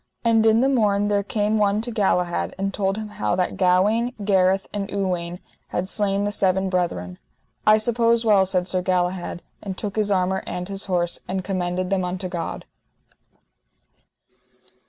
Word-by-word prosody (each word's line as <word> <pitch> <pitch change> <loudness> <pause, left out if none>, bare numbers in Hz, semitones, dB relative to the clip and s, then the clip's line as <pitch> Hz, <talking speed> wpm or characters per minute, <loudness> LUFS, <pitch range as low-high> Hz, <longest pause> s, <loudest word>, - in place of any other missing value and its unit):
And 225 -1 +4
in 220 +1 +4
the 265 - +3
morn 205 -6 +2
there 205 -1 +2
came 210 +1 0
one 205 0 +2
to 240 +2 -5
Galahad 180 -5 0
and 195 0 -2
told 195 0 -1
him 215 -1 -4
how 105 - -1
that 180 0 -1
Gawaine, 200 +7 +2
Gareth, 190 -1 +2
and 200 -1 -3
Uwaine, 180 -3 -2 0.3
had 185 - -3
slain 200 0 0
the 205 - -1
seven 190 -1 +1
brethren. 90 - -2 0.5
I 215 0 +7
suppose 230 +1 +2
well, 200 -3 +4
said 180 -1 0
Sir 185 0 0
Galahad, 180 -1 -1 0.2
and 190 -2 -6
took 205 0 -5
his 210 -1 +1
armour 190 -1 +1
and 180 0 -4
his 195 0 -3
horse, 175 -2 0
and 190 0 -2
commended 180 -1 -2
them 190 -1 +1
unto 180 +1 -3
God. 170 -2 -5
195 Hz, 165 wpm, -23 LUFS, 180-210 Hz, 0.5 s, I